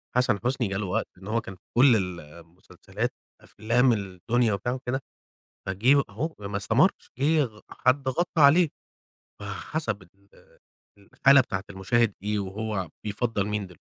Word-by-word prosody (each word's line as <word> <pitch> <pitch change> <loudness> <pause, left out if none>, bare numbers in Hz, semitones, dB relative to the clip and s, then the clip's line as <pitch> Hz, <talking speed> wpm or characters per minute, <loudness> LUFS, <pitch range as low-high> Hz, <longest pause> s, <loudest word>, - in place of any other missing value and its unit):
حسن 125 -5 +2
حسني 125 -2 +1
جاله 100 +1 -2
وقت 105 +5 -1
إن 95 +2 -12
هو 115 +2 0
كان 95 - -9
في 90 - -27 0.2
كل 125 -1 +7
ال 90 -4 -2
المسلسلات، 85 +4 -7 0.3
أفلام 120 +3 +2
الدنيا 105 +3 0
وبتاع 100 +5 -2
وكده، 130 +1 -3 0.7
فجه 120 +9 +3
أهو 150 +11 -4
ما 100 -1 -5
استمرش، 100 - +2
جه 150 +2 +3
غ 110 -4 -9
حد 130 +1 +1
غطى 175 +6 -1
عليه. 155 +4 +6 0.7
فحسب 105 +3 -4
ال 100 +1 -27 0.7
الحالة 130 +7 +4
بتاعة 95 -6 -4
المشاهد 100 +3 +1
إيه 105 0 0
وهو 100 -1 -3
بيفضّل 105 -1 -1
مين 105 -2 -2
دلو 90 -2 -16
110 Hz, 145 wpm, -26 LUFS, 100-125 Hz, 0.7 s, كل